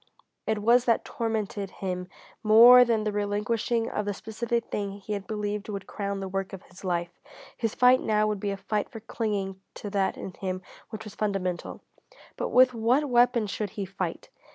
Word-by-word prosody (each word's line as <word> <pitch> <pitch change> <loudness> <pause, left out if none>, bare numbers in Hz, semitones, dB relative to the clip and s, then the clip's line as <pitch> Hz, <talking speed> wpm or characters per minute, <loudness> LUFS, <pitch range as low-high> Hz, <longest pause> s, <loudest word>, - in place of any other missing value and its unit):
It 215 -1 0
was 240 +2 +5
that 230 - +2
tormented 215 -4 -3
him 180 -2 -4 0.3
more 235 +3 +9
than 230 -3 +1
the 215 - -1
relinquishing 210 +3 0
of 210 - -2
the 205 - -1
specific 230 +2 -2
thing 200 -1 -2
he 205 +1 -6
had 200 -2 -5
believed 210 -1 -3
would 200 -2 -5
crown 200 -1 -4
the 195 - -3
work 195 0 -3
of 190 - -8
his 180 +2 -16
life. 175 -2 -1 0.4
His 225 -2 -2
fight 250 +1 +5
now 215 -1 +2
would 210 -1 -1
be 205 - -2
a 195 - -2
fight 210 +1 -2
for 225 - -8
clinging 205 -4 -3
to 205 - -6
that 195 -1 0
in 190 - -7
him 185 -1 -4 0.3
which 220 0 -7
was 210 - -9
fundamental. 195 -4 -2 0.5
But - - -3
with 255 0 +6
what 245 +6 +2
weapon 240 -1 +4
should 205 +1 -3
he 200 - -2
fight? 190 +1 -5
210 Hz, 190 wpm, -27 LUFS, 195-225 Hz, 0.5 s, more